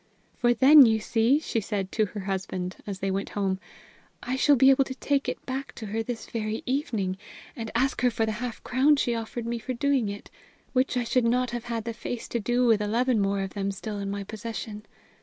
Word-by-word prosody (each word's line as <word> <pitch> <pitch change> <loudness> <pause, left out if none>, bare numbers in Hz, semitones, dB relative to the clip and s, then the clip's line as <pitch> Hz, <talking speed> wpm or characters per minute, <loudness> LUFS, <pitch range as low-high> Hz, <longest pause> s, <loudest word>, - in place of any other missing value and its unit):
"For, 240 -1 +2
then, 270 +2 +9
you 220 -1 +3
see," 225 +4 +2
she 300 -6 -2
said 200 -2 -3
to 215 -2 +1
her 205 +2 -6
husband, 190 -1 -3
as 195 -2 -5
they 195 0 0
went 195 +1 -2
home, 190 -2 0 0.6
"I 250 +2 -2
shall 285 +2 +5
be 265 +1 +6
able 270 0 +4
to 260 - -6
take 280 +1 0
it - - -6
back 265 -1 -5
to 220 - -7
her 215 +2 -2
this 225 0 -5
very 220 -1 -3
evening 225 - -1 0.4
and 225 -2 -5
ask 260 +2 +1
her 250 - +4
for 225 -1 0
the 220 - -1
half 245 -2 -5
crown 270 +4 +4
she 245 -4 0
offered 230 +1 -4
me 235 0 -2
for 240 +3 -4
doing 265 -3 +1
it, 205 0 -8 0.4
which 255 0 +1
I 245 - +1
should 240 +1 +1
not 245 +1 +1
have 240 -1 -4
had 230 -2 -3
the 230 0 -4
face 235 +1 -5
to 235 - -1
do 245 +3 +1
with 225 -3 +4
eleven 235 +3 +1
more 195 0 0
of 195 -1 -4
them 200 -1 -2
still 205 +2 -5
in 200 0 -3
my 200 0 -3
possession. 215 0 -7
230 Hz, 230 wpm, -27 LUFS, 205-250 Hz, 0.6 s, then